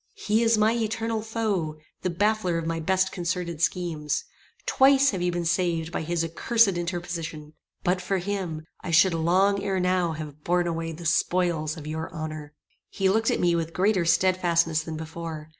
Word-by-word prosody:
"He 220 - +1
is 230 -1 +4
my 215 +1 +3
eternal 225 -1 -1
foe; 210 -8 -2 0.2
the 185 - -1
baffler 195 -1 +1
of 165 - -3
my 165 0 -2
best 190 +3 +1
concerted 170 -2 -3
schemes. 165 -4 -1 0.4
Twice 275 +1 +5
have 190 -4 -3
you 180 0 +1
been 175 0 -2
saved 165 -2 0
by - - -2
his 170 +1 -1
accursed 225 +7 +3
interposition. 170 -4 -4 0.3
But 180 +1 +1
for 190 +2 -1
him 180 -4 -3 0.2
I - - -5
should 170 +2 +5
long 185 +5 +2
ere 190 -2 0
now 180 -2 +1
have 150 -1 -8
borne 175 0 +1
away 165 -1 -2
the 165 +2 -9
spoils 165 -2 +1
of 150 - -8
your 160 +1 -4
honor." 155 -2 -6 0.3
He 195 -1 +1
looked 220 +3 +2
at - - +1
me 175 -1 +3
with 165 -1 -2
greater 190 -1 +2
stedfastness 170 -3 +2
than 160 -1 -6
before. 160 -1 -7
175 Hz, 175 wpm, -26 LUFS, 160-190 Hz, 0.4 s, Twice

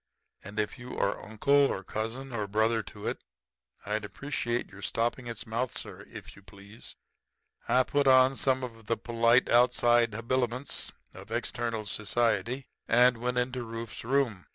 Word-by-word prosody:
And 105 +2 -6
if 105 +4 -2
you 125 +1 -8
are 100 - 0
uncle 110 +6 -1
or 140 -9 +3
second - - -15
cousin 120 +5 -3
or 105 -3 -2
brother 110 +2 +2
to 105 +1 -10
it, - - -3 0.6
I'd 105 +1 -1
appreciate 120 +1 -3
your 100 - -12
stopping 120 +4 -1
its 115 -2 -6
mouth, 120 +3 -2
sir, - - -7
yourself, - - -15
if - - -9
you - - -15
please.' 100 +2 -11 0.7
"I 130 - +4
put 145 +1 +1
on 130 0 +6
some 130 -1 +1
of 115 -3 -8
the 115 - +1
polite 115 +2 +3
outside 120 -2 +4
habiliments 125 +3 -1 0.2
of - - -12
external 115 -2 -2
society 120 +5 0 0.2
and 120 0 +5
went 125 +1 -1
into 125 0 -1
Rufe's 115 -1 -7
room. 120 -6 0
120 Hz, 165 wpm, -29 LUFS, 110-125 Hz, 0.7 s, on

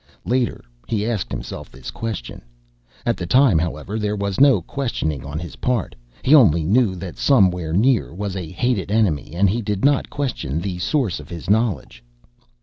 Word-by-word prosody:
Later, 125 0 0 0.2
he 105 -2 -1
asked 110 -5 -2
himself - - -6
this 65 -1 -9
question. 110 - -5 0.6
At 120 - +1
the 90 - -5
time, 125 - +5
however, 85 +6 -3
there 105 0 -1
was 100 -2 -2
no 140 -1 +6
questioning 90 - -3
on 70 +2 -6
his 85 +1 -7
part. 125 -6 -1 0.3
He 140 - +4
only 95 - +6
knew 100 +3 +2
that 90 -1 -8
somewhere 90 - +3
near 115 +8 +2
was 100 +2 -4
a 90 -4 -5
hated 105 +2 -1
enemy 100 -10 +1
and 100 +3 +3
he 110 +5 0
did 105 +1 -1
not 140 -1 +2
question 125 - -3
the 90 0 -4
source 125 - 0
of - - -12
his 85 +2 -4
knowledge.... 105 - 0
100 Hz, 175 wpm, -21 LUFS, 85-120 Hz, 0.6 s, no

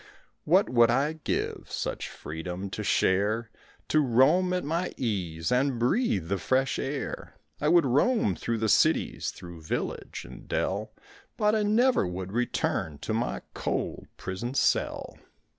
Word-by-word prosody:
What 185 +6 +4
would 120 -2 +5
I 140 +6 +2
give 160 - -3
Such - - -3
freedom 90 +5 -6
to - - -4
share, 105 +4 +1 0.4
To 155 - +4
roam 150 +8 +4
at 180 0 0
my 170 +5 -2
ease 90 -7 -2
And 130 +1 +2
breathe 120 - +1
the 100 +1 -1
fresh 130 0 +1
air; 135 +1 -4 0.2
I 150 - 0
would 170 0 +5
roam 140 - +3
through 115 +5 -2
the 110 0 0
cities, - - +2
Through 85 -2 -10
village 80 - -4
and - - -12
dell, - - -1 0.5
But 210 -1 +3
I 220 - +2
never 220 - +3
would 90 +1 -5
return 105 -9 -1
To 110 - -4
my 115 +2 -2
cold - - -3
prison 105 +8 -5
cell. - - 0
120 Hz, 145 wpm, -28 LUFS, 95-155 Hz, 0.5 s, would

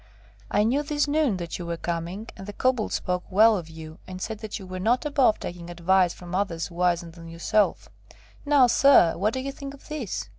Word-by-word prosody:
I 205 - +2
knew 250 +7 +2
this 295 0 -1
noon 290 -8 +1
that 170 -1 -5
you 175 - -5
were 170 0 -3
coming, 175 +6 -4
and 190 - -10
the 205 - -6
Kobold 250 -1 0
spoke 180 0 -2
well 215 +3 +5
of 170 -5 -5
you, 160 +1 -10
and 185 0 -7
said 215 +2 -5
that 215 -1 -5
you 195 - -10
were 185 0 -6
not 235 +9 +1
above 280 -7 +3
taking 175 -1 -7
advice 175 +1 +2
from 175 0 -10
others 180 -3 -2
wiser 170 -1 0
than 165 0 -12
yourself. 170 +5 0 0.6
Now, 285 -3 +5
sir! 245 -8 +5
What 205 +5 0
do - - -1
you 275 +1 -4
think 275 0 -8
of 280 - -19
this?" 290 -10 -4
195 Hz, 215 wpm, -25 LUFS, 175-255 Hz, 0.6 s, well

